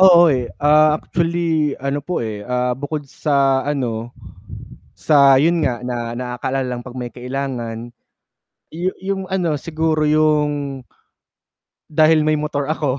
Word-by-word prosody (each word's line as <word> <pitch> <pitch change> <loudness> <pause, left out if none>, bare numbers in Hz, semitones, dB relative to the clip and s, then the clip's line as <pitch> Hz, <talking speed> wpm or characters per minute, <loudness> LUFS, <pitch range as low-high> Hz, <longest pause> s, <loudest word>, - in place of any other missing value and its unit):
Oo, 175 -4 +7
eh, 125 -2 -1
ah, 150 +1 +4
actually 165 -3 -1
ano 140 +2 -2
po, 155 -3 -3
eh, 105 -2 -5
ah, 125 0 0
bukod 145 +3 -4
sa 135 -1 +1
ano, 125 -5 -3 0.8
sa 140 -3 +5
'yun 165 +2 +2
nga, 120 -2 -1
na 120 -1 -4
nakakaalala 125 +2 -3
lang - - -6
'pag 125 - -9
may 125 -1 -5
kailangan, 125 -2 -5 0.8
yu 175 +4 -3
'yung 190 0 -3
ano 180 -5 -1
siguro 155 0 -1
'yung 150 -3 +1 1.0
dahil 155 0 +3
may 155 - +2
motor 150 -2 -2
ako, 145 -3 -1
145 Hz, 135 wpm, -19 LUFS, 125-155 Hz, 1.0 s, Oo